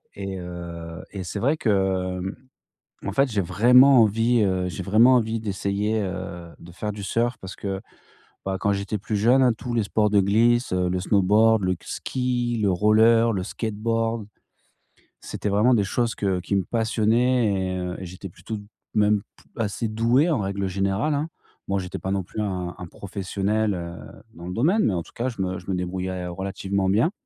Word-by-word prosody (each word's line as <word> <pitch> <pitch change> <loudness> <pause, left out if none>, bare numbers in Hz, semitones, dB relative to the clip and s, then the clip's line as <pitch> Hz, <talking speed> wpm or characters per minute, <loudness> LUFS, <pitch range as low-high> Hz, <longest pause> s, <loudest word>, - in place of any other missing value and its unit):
et 95 -1 -5
heu, 85 -1 -7
et 95 -2 -5
c'est 100 +3 -4
vrai 145 +7 +1
que, 95 -5 0
mmh, 95 +2 -4 0.7
en - - -1
fait, 135 +5 +3
j'ai 105 -2 +1
vraiment 125 +7 +6
envie, 115 +3 +2
heu, 95 -2 0
j'ai 90 - -6
vraiment 110 +7 +5
envie 115 -2 +1
d'essayer, 105 +1 -1
heu, 90 -3 -5
de 85 - -12
faire 105 +4 -4
du 100 -1 -7
surf 120 +4 0
parce 95 0 -8
que, 95 0 -4 0.6
ben, 95 0 -1
quand 100 - +1
j'étais 100 +2 -2
plus 105 +1 -3
jeune, 120 +6 +4
hein, 125 - +5
tous 120 +2 -6
les 115 -2 +2
sports 105 +1 +1
de 100 -1 +4
glisse, 115 +5 +3
heu, 90 -1 +1
le 90 0 -1
snowboard, 105 +3 +3
le 90 0 +1
k - - -20
ski, 120 -2 -2
le 100 -2 +3
roller, 110 +4 +4
le 95 -2 -2
skateboard, 115 +1 -2 0.9
c'était - - -5
vraiment 105 +6 +4
des 105 - +2
choses 115 +3 0
que 95 -3 0
qui 95 +3 -2
me 95 - +1
passionnaient 115 +1 +2
et 95 -1 -1
heu, 90 0 -4
j'étais 90 +1 -8
plutôt 110 +6 -7
b 105 - -10 0.3
même 105 -1 +3 0.2
p - - -20 0.2
assez 110 +2 -2
doué, 115 +8 +2
en 150 -7 +1
règle 100 -1 -2
générale, 100 +10 0
hein. 150 +3 -2 0.4
Bon, 100 - +1
j'étais 95 +1 -5
pas 95 +3 -3
non 95 -1 0
plus 105 - -5
un 90 -4 -3
un 90 - -7
professionnel, 100 +3 -2
heu, 85 -1 -6 0.4
dans 85 +1 -9
le 90 - -4
domaine, 170 - +2
mais 105 - +2
en 85 -2 -2
tout - - -18
cas, 125 +2 -2
je 115 -6 -6
me 95 0 -2
je - - -17
me 95 - 0
débrouillais 90 0 -3
relativement 95 +1 -2
bien. 110 - +3
100 Hz, 195 wpm, -24 LUFS, 95-115 Hz, 0.9 s, vraiment